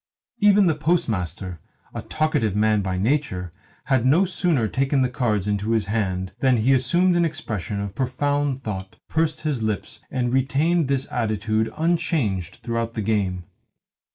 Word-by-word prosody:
Even 205 -1 +5
the 165 - +3
Postmaster 100 - -1 0.3
a - - -4
talkative 115 -10 0
man 105 0 +3
by 95 -1 -2
nature 95 - -1 0.3
had 130 -4 +1
no 155 +10 +4
sooner 175 - +1
taken 135 +3 +1
the 130 - +1
cards 110 -6 0
into 105 +1 -1
his 110 -3 +1
hands 95 -3 -1
than 130 -1 +3
he 120 +5 +3
assumed 170 +8 +3
an 175 - +3
expression 110 - -3
of 100 -1 -4
profound 135 +2 -1
thought, 95 -3 -5
pursed 160 0 0
his 150 -6 -1
lips, 110 +1 -3
and 125 -1 -1
retained 145 +5 +2
this 135 -1 0
attitude 110 -1 0
unchanged 155 - 0
throughout 115 -1 -2
the 110 - -2
game. 95 -4 0
120 Hz, 155 wpm, -23 LUFS, 105-145 Hz, 0.3 s, Even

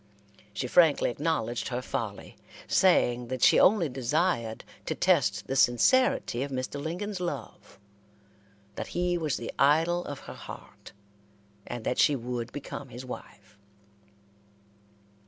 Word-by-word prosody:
She 105 - -4
frankly 155 0 +4
acknowledged 120 -5 -2
her 125 -1 -2
folly, - - -5 0.3
saying 125 -10 +3
that 130 0 -3
she - - +6
only 190 -4 +5
desired 130 -2 -1 0.2
to - - -1
test - - +2
the 135 - -3
sincerity 125 - +3
of 140 - -2
Mr. 130 +1 -4
Lincoln's 180 +6 -4
love, 145 -10 -6 1.0
that - - -5
he 175 0 +1
was 155 -5 -1
the 115 - -6
idol 165 +5 +3
of 145 -2 -7
her - - -9
heart, - - -11 0.8
and 120 - -5
that - - -1
she 145 - +5
would 120 -1 -4
become 140 -1 -7
his 125 +1 -9
wife. 105 -4 -11
135 Hz, 130 wpm, -28 LUFS, 120-170 Hz, 1.0 s, she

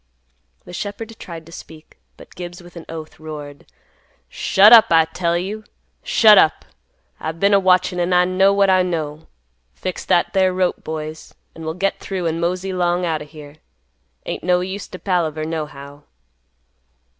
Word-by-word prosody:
The - - -11
shepherd 210 +4 -6
tried 165 -2 -9
to 165 - -15
speak, 160 -1 -13 0.2
but - - -15
Gibbs, 175 -1 -8
with 175 0 -16
an 170 - -9
oath, 160 -1 -9
roared, 150 -2 -9 0.6
"Shut 205 +4 +5
up, 225 -2 +9
I 165 -1 +5
tell 170 +1 -1
you. 205 +5 -5 0.4
Shut 220 - +6
up. 155 - +2 0.5
I've 160 +1 -5
been 200 +2 +3
a 200 - +6
watchin', 185 -1 +2
an' 175 +1 0
I 180 0 +4
know 190 +2 +3
what 200 -1 +3
I 185 0 +4
know. 160 -3 -4 0.5
Fix 185 -1 -5
that 175 - +1
there 190 -1 +2
rope, 185 -1 -1
boys, 155 0 -7 0.2
an 160 - -10
we'll 160 0 -3
get 195 +2 -1
through, 190 -3 -4
an' 165 0 -1
mosey 185 +2 -2
'long 175 0 0
out 160 -2 -1
o' - - -7
here. 150 -1 -13 0.7
Ain't - - -5
no 180 0 +2
use 190 +1 -5
to 185 - -9
palaver, 165 -5 -1
nohow." 145 -3 -6
175 Hz, 170 wpm, -20 LUFS, 160-185 Hz, 0.7 s, up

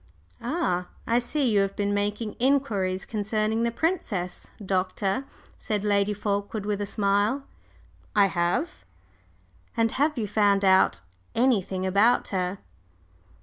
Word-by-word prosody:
"Ah, 235 - -1 0.2
I 235 +1 +3
see 270 +3 0
you 210 -3 +3
have 195 0 0
been 205 0 0
making 205 +2 -1
inquiries 225 -9 +1
concerning 215 +1 -1
the 235 - +2
princess, 230 - -2 0.2
Doctor," 190 +5 -1 0.3
said 210 -2 -2
Lady 205 0 +2
Fulkeward, 205 0 -2
with 205 -1 -1
a 205 - -2
smile. 205 +6 +1 0.7
"I 205 -1 +6
have." 175 - 0 1.0
"And 225 -1 +2
have 295 +1 +1
you 225 - -1
found 200 -1 +3
out 190 - +4 0.3
anything 200 -6 +1
about 205 +6 +3
her?" 185 0 -1
205 Hz, 125 wpm, -26 LUFS, 195-230 Hz, 1.0 s, I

